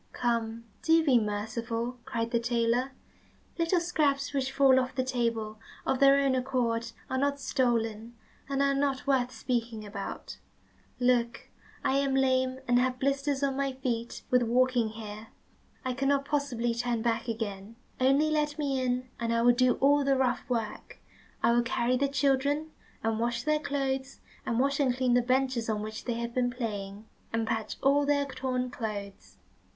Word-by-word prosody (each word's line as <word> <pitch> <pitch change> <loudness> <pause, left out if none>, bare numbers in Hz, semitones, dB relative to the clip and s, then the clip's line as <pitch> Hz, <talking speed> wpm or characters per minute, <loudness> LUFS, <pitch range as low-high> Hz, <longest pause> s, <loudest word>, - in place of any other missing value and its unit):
"Come, 230 -1 -1 0.2
do 325 -1 +4
be 260 -5 +5
merciful," 230 +3 -3
cried 230 -3 -2
the 235 - +2
tailor. 235 +2 0 0.7
"Little 335 +2 +3
scraps 290 -5 0
which 265 -1 -1
fall 270 -1 +5
off 260 +1 -3
the 260 - +1
table 230 -4 -2 0.3
of 265 - +1
their 275 0 +7
own 275 -1 +2
accord 245 -3 -1 0.2
are 260 - -1
not 280 +1 0
stolen, 235 -4 -1 0.3
and 275 0 +1
are 275 0 +3
not 275 -1 0
worth 260 -3 +2
speaking 230 -4 -3
about. 200 -1 -7 0.6
Look, 245 -1 +1 0.3
I 265 - +2
am 275 -1 +1
lame, 260 -1 +2
and 245 0 +4
have 255 0 +1
blisters 275 +1 0
on 275 -1 +1
my 275 -1 -1
feet 245 -3 -3
with 250 0 +5
walking 245 -1 +2
here, 215 0 -8 0.6
I 255 - 0
cannot 275 +2 +1
possibly 270 -5 -1
turn 235 -1 -1
back 235 0 0
again. 215 -2 -4 0.2
Only 275 +4 +3
let 300 -1 0
me 275 -3 0
in, 250 0 -1
and 230 0 -1
I 230 0 +2
will 245 0 +6
do 250 0 +3
all 285 +1 +4
the 275 0 +3
rough 260 +1 0
work. 225 -4 -3 0.5
I - - +5
will 240 0 +4
carry 235 +1 0
the 280 +2 +2
children, 285 +2 +1 0.3
and 225 0 0
wash 235 0 -1
their 305 0 +2
clothes, 270 -3 -2 0.3
and 230 0 0
wash 275 +2 +1
and 260 -4 +2
clean 255 -2 +2
the 245 - +5
benches 255 -2 0
on 210 -1 -1
which 215 0 -6
they 240 - -1
have 235 0 -4
been 245 0 +1
playing, 210 -4 -5 0.3
and 225 0 0
patch 220 -1 -2
all 280 +1 +4
their 285 -1 +2
torn 255 -2 -3
clothes." 210 -6 -6
255 Hz, 170 wpm, -29 LUFS, 230-275 Hz, 0.7 s, their